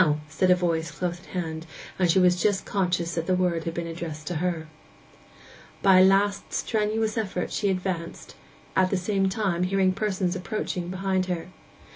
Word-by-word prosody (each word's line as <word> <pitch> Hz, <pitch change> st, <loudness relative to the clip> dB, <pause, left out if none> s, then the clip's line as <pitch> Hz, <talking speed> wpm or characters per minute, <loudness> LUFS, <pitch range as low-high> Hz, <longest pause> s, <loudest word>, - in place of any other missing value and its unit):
said 155 Hz, +5 st, +1 dB
a 180 Hz, -, +7 dB
voice 170 Hz, -2 st, 0 dB
close 175 Hz, -1 st, -3 dB
at -, -, -18 dB
hand, 165 Hz, -2 st, -4 dB, 0.3 s
and 180 Hz, -2 st, +3 dB
she 170 Hz, -, +4 dB
was 180 Hz, -1 st, +4 dB
just 205 Hz, -2 st, +1 dB
conscious 175 Hz, -3 st, 0 dB
that 165 Hz, 0 st, -2 dB
the 185 Hz, -, +3 dB
word 175 Hz, -3 st, 0 dB
had 165 Hz, 0 st, -3 dB
been 170 Hz, -, -2 dB
addressed 165 Hz, -2 st, -6 dB
to 175 Hz, +1 st, -2 dB
her. 170 Hz, -1 st, -2 dB, 1.2 s
By 190 Hz, -1 st, +7 dB
a -, -, +8 dB
last 200 Hz, +1 st, +3 dB
strenuous 220 Hz, 0 st, 0 dB
effort 190 Hz, -4 st, -3 dB
she 205 Hz, -, 0 dB
advanced, 180 Hz, -3 st, -3 dB, 0.4 s
at 185 Hz, -1 st, +4 dB
the 195 Hz, -, +1 dB
same 195 Hz, +1 st, +1 dB
time 190 Hz, -4 st, -1 dB
hearing 185 Hz, 0 st, +2 dB
persons 190 Hz, -3 st, -1 dB
approaching 185 Hz, -2 st, -3 dB
behind 185 Hz, 0 st, -1 dB
her. 180 Hz, -1 st, -3 dB
185 Hz, 175 wpm, -26 LUFS, 170-195 Hz, 1.2 s, a